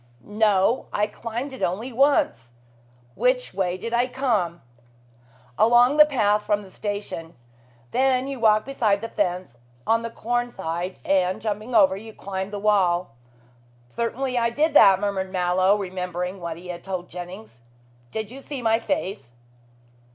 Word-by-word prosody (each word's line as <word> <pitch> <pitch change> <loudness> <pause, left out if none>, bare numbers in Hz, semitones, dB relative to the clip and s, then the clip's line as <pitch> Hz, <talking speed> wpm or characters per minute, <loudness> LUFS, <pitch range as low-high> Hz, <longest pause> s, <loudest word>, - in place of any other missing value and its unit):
"No! 210 +2 +2
I 210 - +1
climbed 235 +5 -6
it 260 - -9
only 220 +9 -2
once. 225 - +2 0.6
Which 250 - 0
way 185 -1 -1
did 230 +5 -6
I 240 +1 +2
come?" 215 - -1 1.0
"Along 240 +5 +5
the 300 0 +8
path 210 -7 +2
from 205 0 0
the 190 - -14
station. 200 -6 -5 0.6
Then 260 0 +2
you 275 -2 -5
walked 215 -1 +4
beside 220 -7 +1
the 230 - -5
fence 180 - -2 0.3
on 230 0 +2
the 230 - -4
corn 240 +2 -2
side, 180 -3 -4
and 185 -1 +1
jumping 215 +3 -4
over, 190 -3 +5
you 220 +3 -10
climbed 190 0 -5
the 205 - -4
wall." 190 - +2 0.8
"Certainly 245 - -2
I 235 0 +2
did 300 +6 +1
that," 195 -8 +7
murmured 195 -2 -2
Mallow, 185 +2 +2
remembering 180 -1 -4
what 170 -1 -5
he 180 +1 -11
had 175 -1 -6
told 185 -2 -4
Jennings. 180 - -9 0.5
"Did 220 - -5
you 265 - -9
see 275 -2 -7
my 225 0 +3
face?" 195 - -3
205 Hz, 150 wpm, -24 LUFS, 185-235 Hz, 1.0 s, the